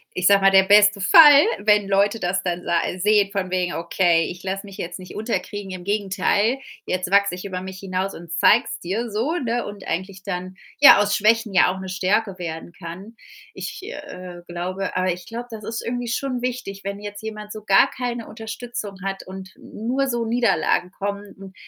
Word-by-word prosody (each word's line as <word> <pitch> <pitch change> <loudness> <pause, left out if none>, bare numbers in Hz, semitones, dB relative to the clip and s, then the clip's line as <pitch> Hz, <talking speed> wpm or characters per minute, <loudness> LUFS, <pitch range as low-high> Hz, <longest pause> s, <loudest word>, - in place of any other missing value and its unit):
ich 180 - -1
sage 200 0 +6
mal, 195 - +6
der 190 0 +6
beste 205 +1 +5
Fall, 290 - +8 0.2
wenn 210 -1 +3
Leute 200 +3 +2
das 180 0 -1
dann 180 -1 -3
sa 170 - +1 0.2
sehen 205 +1 +3
von 190 -2 -3
wegen: 180 -1 -1
„Okay, 170 0 +2
ich 180 0 -7
lasse 195 +1 -4
mich 195 -1 -11
jetzt 175 0 -5
nicht 185 -1 -11
unterkriegen. 205 -2 -4
Im 185 -1 -7
Gegenteil, 205 +4 0 0.3
jetzt 185 0 -2
wachse 200 -2 +3
ich 180 - -9
über 185 -2 -4
mich 190 0 -8
hinaus 190 0 -3
und 170 -1 -11
zeig's 170 - +3
dir,“ 215 +6 -3
so, 230 +10 -1
ne, 240 -6 -1
und 205 -1 -9
eigentlich 185 +2 -4
dann 180 +1 -5 0.2
ja 285 - +9
aus 205 0 +2
Schwächen 220 0 +2
ja 180 0 +5
auch 190 - -6
'ne 190 0 -7
Stärke 185 +2 0
werden 165 -1 -6
kann. 185 +6 -10 0.4
Ich, - - -7
äh, 180 - -9
glaube 180 +3 -4
aber 185 -1 +1
ich 180 - -11
glaube, 235 +2 -6
das 220 -2 -8
ist 225 +2 -5
irgendwie 245 0 -3
schon 250 +2 -2
wichtig, 245 -6 -4
wenn 200 +1 -5
jetzt 205 0 -8
jemand 215 -1 -7
so 215 -1 -8
gar 195 -2 +5
keine 240 -2 -4
Unterstützung 225 -1 -7
hat 195 0 -4
und 190 0 -9
n 220 - -10
nur 270 +3 +1
so 240 -2 -1
Niederlagen 205 -7 +1
kommen. 200 +1 -4 0.2
N 195 -1 -11
200 Hz, 200 wpm, -22 LUFS, 185-220 Hz, 0.4 s, ja